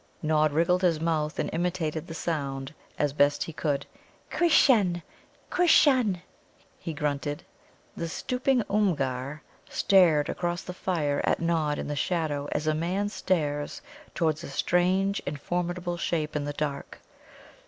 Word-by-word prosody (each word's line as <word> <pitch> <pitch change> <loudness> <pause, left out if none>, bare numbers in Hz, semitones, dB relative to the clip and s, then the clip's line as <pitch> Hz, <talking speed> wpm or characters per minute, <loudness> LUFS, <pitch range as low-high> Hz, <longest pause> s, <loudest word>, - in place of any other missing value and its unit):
Nod 155 -1 +3
wriggled 170 +4 +2
his 170 -4 +2
mouth, 155 -2 -1
and - - -1
imitated 165 -2 -2
the 165 - -7
sound 140 -4 -3 0.2
as 145 -2 0
best 145 0 +3
he 165 - -7
could. 145 -2 -1 0.5
"Krisshun, 215 - +4 0.5
Krisshun," 255 - +4 0.6
he 170 - -5
grunted. 145 -1 -2 0.5
The 170 - -3
stooping 250 +7 0
Oomgar 145 -8 0 0.3
stared 170 -7 +4
across 175 0 -2
the 180 - -6
fire 155 -6 -1
at - - +1
Nod 160 -3 0
in - - -4
the 145 - -3
shadow 145 -3 -1
as 150 - -1
a 155 - +2
man 180 +6 -1
stares 150 -8 -2 0.3
towards 160 -2 0
a - - -7
strange 185 +6 +1
and 145 0 -3
formidable 175 +2 -2
shape 155 -3 -2
in 145 -1 -1
the 145 - -3
dark. 145 -1 -4
165 Hz, 140 wpm, -27 LUFS, 150-180 Hz, 0.6 s, Krisshun